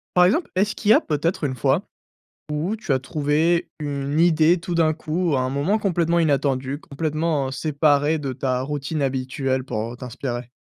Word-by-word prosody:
par 180 Hz, 0 st, +7 dB
exemple, 285 Hz, -, +1 dB
est-ce 200 Hz, +3 st, +1 dB
qu'il 210 Hz, -, -2 dB
y -, -, +9 dB
a -, -, +5 dB
peut-être 160 Hz, +3 st, -1 dB
une 135 Hz, -3 st, -1 dB
fois 120 Hz, -, +1 dB, 0.7 s
où 155 Hz, +7 st, -1 dB
tu 220 Hz, -9 st, -3 dB
as 130 Hz, -, +3 dB
trouvé 150 Hz, +5 st, +1 dB
une 145 Hz, -1 st, -2 dB
idée, 165 Hz, 0 st, +4 dB
tout 170 Hz, +1 st, -4 dB
d'un 160 Hz, -2 st, +3 dB
coup, 160 Hz, 0 st, -1 dB
à -, -, +1 dB
un 130 Hz, -, -1 dB
moment 145 Hz, +11 st, +1 dB
complètement 170 Hz, -4 st, +1 dB
inattendu, 140 Hz, -3 st, 0 dB
complètement 155 Hz, -2 st, -2 dB
séparé 145 Hz, +1 st, +2 dB
de 140 Hz, -3 st, -3 dB
ta 130 Hz, -1 st, -1 dB
routine 145 Hz, +2 st, -3 dB
habituelle 130 Hz, 0 st, -1 dB
pour, 115 Hz, -2 st, -3 dB
heu, -, -, -9 dB
t'inspirer? 125 Hz, -1 st, -5 dB
150 Hz, 180 wpm, -23 LUFS, 135-165 Hz, 0.7 s, y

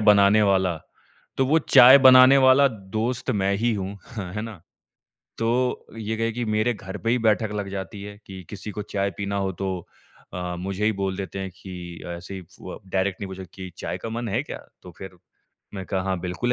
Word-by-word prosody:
बनाने 105 Hz, 0 st, +5 dB
वाला 95 Hz, -4 st, +2 dB, 0.6 s
तो 130 Hz, -, +2 dB
वो 155 Hz, +4 st, +4 dB
चाय 135 Hz, -3 st, +8 dB
बनाने 130 Hz, 0 st, +8 dB
वाला 130 Hz, +1 st, +6 dB
दोस्त 110 Hz, +4 st, -3 dB
मैं 100 Hz, -3 st, +1 dB
ही 115 Hz, +3 st, +1 dB
हूँ, 100 Hz, 0 st, -4 dB, 0.2 s
ह 90 Hz, -3 st, -5 dB
है 105 Hz, -, -2 dB
ना? 110 Hz, -7 st, -8 dB, 0.8 s
तो 120 Hz, +2 st, 0 dB
ये 110 Hz, 0 st, -3 dB
कहे 115 Hz, 0 st, 0 dB
कि 120 Hz, +2 st, -3 dB
मेरे 110 Hz, +3 st, +1 dB
घर 95 Hz, -1 st, -8 dB
पे 115 Hz, -, -2 dB
ही 125 Hz, -, +3 dB
बैठक 110 Hz, -1 st, +2 dB
लग 100 Hz, -1 st, -3 dB
जाती 100 Hz, +1 st, -6 dB
है 105 Hz, 0 st, -9 dB
कि 95 Hz, -2 st, -9 dB
किसी 105 Hz, +1 st, -7 dB
को 105 Hz, -, -5 dB
चाय 100 Hz, -1 st, -2 dB
पीना 100 Hz, 0 st, -3 dB
हो 95 Hz, -1 st, -1 dB
तो 95 Hz, -3 st, -3 dB, 0.5 s
अ, 90 Hz, -1 st, -4 dB
मुझे 95 Hz, +3 st, -2 dB
ही 110 Hz, -, +3 dB
बोल 95 Hz, -1 st, -2 dB
देते 95 Hz, 0 st, -5 dB
हैं 95 Hz, -1 st, -4 dB
कि 90 Hz, -2 st, -9 dB
ऐसे 90 Hz, -, -9 dB
ही 95 Hz, -, -7 dB
फु 85 Hz, -, -13 dB
अ, -, -, -8 dB
डायरेक्टली 95 Hz, +1 st, -1 dB
मुझे 95 Hz, 0 st, -8 dB
कि 95 Hz, -1 st, -8 dB
चाय -, -, -4 dB
का 115 Hz, -, -6 dB
मन 115 Hz, +1 st, -4 dB
है 115 Hz, +6 st, 0 dB
क्या? -, -, -7 dB, 0.3 s
तो 90 Hz, -, -11 dB
फ़िर 95 Hz, -2 st, -10 dB, 0.6 s
मैं 95 Hz, -1 st, -5 dB
कहा 95 Hz, 0 st, -1 dB
हाँ, 95 Hz, -1 st, -1 dB
बिल्कुल 95 Hz, +7 st, -1 dB
100 Hz, 210 wpm, -24 LUFS, 95-115 Hz, 0.8 s, चाय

